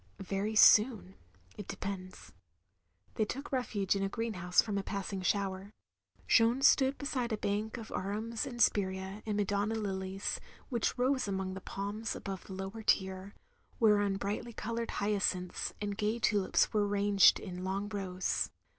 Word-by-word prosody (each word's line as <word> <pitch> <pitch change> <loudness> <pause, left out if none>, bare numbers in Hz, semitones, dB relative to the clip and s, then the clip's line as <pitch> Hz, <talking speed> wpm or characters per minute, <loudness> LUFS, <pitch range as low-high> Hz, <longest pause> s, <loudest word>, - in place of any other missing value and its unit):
"Very 200 +3 -2
soon 210 -3 +6 0.2
— - - -28
^it 205 - -6
depends." 190 -2 -6 0.8
They 220 - +1
took 275 +7 -6
refuge 215 -7 0
in 195 - -1
a 195 - 0
greenhouse 195 -6 -1
from 205 -3 +2
a - - -1
passing 195 -1 -4
shower. 195 0 -1 0.6
Jeanne 230 - +4
stood 270 0 +5
beside 255 -5 -2
a 220 - 0
bank 210 +3 -2
of 225 -2 -8
arums 220 +6 -3
and 240 -3 -7
spirea 190 -1 +1
and 210 -1 -1
Madonna 205 +2 0
lilies, 195 -2 -3 0.3
which 240 -1 0
rose 255 -1 +1
among 190 -1 -2
the 190 - -7
palms 205 +4 -4
above 195 -2 -6
the 190 - -8
lower 195 +4 -6
tier, 190 -1 0 0.4
whereon 205 -3 +4
brightly 205 +4 -3
coloured 230 +1 -3
hyacinths 200 -3 -1
and 205 0 -4
gay 215 +2 0
tulips 205 -3 +2
were 210 -1 +2
ranged 200 -1 +5
in 180 -2 -7
long 195 +2 -2
rows. 190 -3 -2
205 Hz, 155 wpm, -32 LUFS, 195-220 Hz, 0.8 s, soon